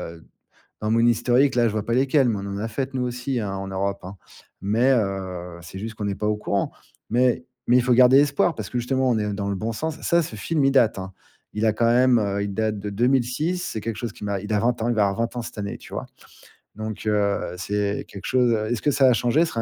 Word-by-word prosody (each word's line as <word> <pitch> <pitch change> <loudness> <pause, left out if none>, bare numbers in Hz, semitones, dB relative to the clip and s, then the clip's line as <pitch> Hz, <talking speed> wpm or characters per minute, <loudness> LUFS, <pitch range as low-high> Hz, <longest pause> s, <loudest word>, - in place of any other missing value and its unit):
heu, 80 - -16 0.6
dans 110 - 0
mon 115 - +3
historique, 120 +3 +3
là, 120 -1 +3
je 110 - 0
vois 110 -1 -2
pas 115 - 0
lesquelles. 135 0 +3
Mais 110 - 0
on - - -6
en 100 0 -4
a 110 +2 -3
faites, 130 +4 -3
nous 130 - -2
aussi, 125 +1 -2
hein, 100 -2 -3
en 95 0 -5
Europe, 100 +1 -2
hein. 95 +2 -9 0.4
Mais, 110 +7 +2
heu, 95 -6 -2
c'est 90 +3 -9
juste 115 +2 -6
qu'on 105 -1 -4
est 100 - -1
pas 105 +2 -3
au 105 - +1
courant. 100 -1 -1 0.4
Mais 125 +2 +2 0.2
mais 125 - +5
il - - +3
faut 125 +1 +2
garder 125 +2 +7
espoir, 145 +3 +2
parce 110 -5 -6
que, 125 - -2
justement, 130 +2 0
on 115 - +2
est 105 -1 -1
dans 100 0 -3
le 100 - -1
bon 110 +4 -3
sens. 160 +7 -4
Ça 170 0 +3
ce 115 - -7
film, 150 +7 0
il 135 - +4
date, 120 -7 +3
hein. 95 0 -6 0.4
Il 105 - -1
a 110 - +4
quand 115 +2 +1
même, 125 +1 +4
heu, 100 -1 -1
il 100 - -3
date 110 +1 -1
de 100 +1 -5
2006. 125 - +1
C'est 110 - -4
quelque 115 0 -4
chose 115 0 -4
qui - - -16
m'a 100 -1 -1
il 105 +2 -5
a 105 - +3
20 120 +1 0
ans, 115 - 0
il - - +1
va 105 -2 +3
avoir 100 - -3
20 115 +1 -1
ans 120 - -2
cette - - -9
année, 100 -1 -4
tu - - -12
vois? - - -3 0.7
Donc, 110 0 -6
heu, 105 -3 0
c'est 100 +2 -2
quelque 100 - -10
chose, 125 -2 +2
heu 110 -1 0
est-ce 120 - -1
que - - +2
ça 135 0 +3
a 125 - +6
changé? 120 +6 +2
Ce - - -5
serait 115 - -2
110 Hz, 275 wpm, -23 LUFS, 100-125 Hz, 0.7 s, garder